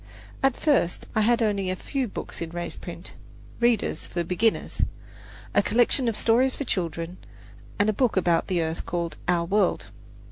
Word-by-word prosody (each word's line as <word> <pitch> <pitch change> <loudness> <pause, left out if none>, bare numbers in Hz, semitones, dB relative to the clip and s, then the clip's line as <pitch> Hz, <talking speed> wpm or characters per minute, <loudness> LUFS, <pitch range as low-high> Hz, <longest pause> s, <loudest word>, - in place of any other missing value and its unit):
At 270 -2 +2
first 275 - +2
I 215 - +2
had 235 +2 +3
only 200 -3 0
a 185 - 0
few 265 +6 -2
books 195 - -6
in 165 - -3
raised 175 +1 -5
print - - -8 0.5
"readers" 235 -3 +1
for 175 - -2
beginners, 210 +6 0 0.7
a - - +5
collection 240 +3 +2
of 230 - 0
stories 250 +3 +3
for - - -3
children, 170 - -3 0.6
and 205 - +3
a 215 - +3
book 240 -1 +1
about 170 -2 +2
the 175 -3 +1
earth 160 +1 -4
called 170 -1 -2
"Our 175 -1 +2
World." 200 +4 +1
200 Hz, 170 wpm, -26 LUFS, 175-235 Hz, 0.7 s, a